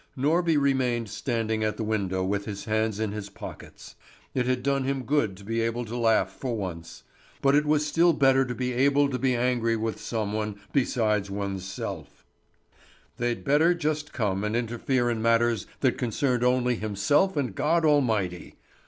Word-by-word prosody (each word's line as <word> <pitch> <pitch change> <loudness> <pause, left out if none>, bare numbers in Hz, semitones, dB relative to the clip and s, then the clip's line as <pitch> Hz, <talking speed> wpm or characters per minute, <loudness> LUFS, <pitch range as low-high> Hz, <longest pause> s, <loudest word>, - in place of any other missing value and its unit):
Norby 160 +3 +2
remained 125 -5 +1
standing 110 -3 -1
at 110 0 -1
the 115 - -2
window 95 -4 -1
with 100 +1 -1
his 100 -2 -6
hands 110 -1 0
in 110 -2 -1
his 105 -1 -6
pockets. - - -10 0.4
It 125 -1 0
had 125 -1 0
done 140 0 +1
him 135 0 -2
good 120 -9 0
to 100 - -13
be 115 +3 -1
able 115 +1 -1
to 115 +2 -6
laugh 110 -5 +2
for 120 +2 -4
once; 85 -5 -6 0.4
but 135 0 +3
it 150 +1 +3
was 150 0 +2
still 170 +3 +4
better 135 -3 +4
to 125 -2 -4
be 125 0 -2
able 140 +3 +3
to 125 - -2
be 130 -2 +1
angry 120 -1 +1
with 110 0 -3
some 110 -3 -3
one 105 -1 -3
besides 110 -7 +1
one's 100 -1 -4
self. 95 -1 -7 0.9
They'd 120 0 -2
better 155 +5 +4
just 155 -2 -2
come 100 -4 -1
and 105 +1 -1
interfere 120 +2 0
in 115 -2 -1
matters 115 -2 +2
that 130 -1 +1
concerned 125 0 0
only 125 -1 +2
himself 110 - +1
and 130 -8 -1
God 160 - +1
Almighty! 110 - +1
120 Hz, 180 wpm, -26 LUFS, 105-135 Hz, 0.9 s, still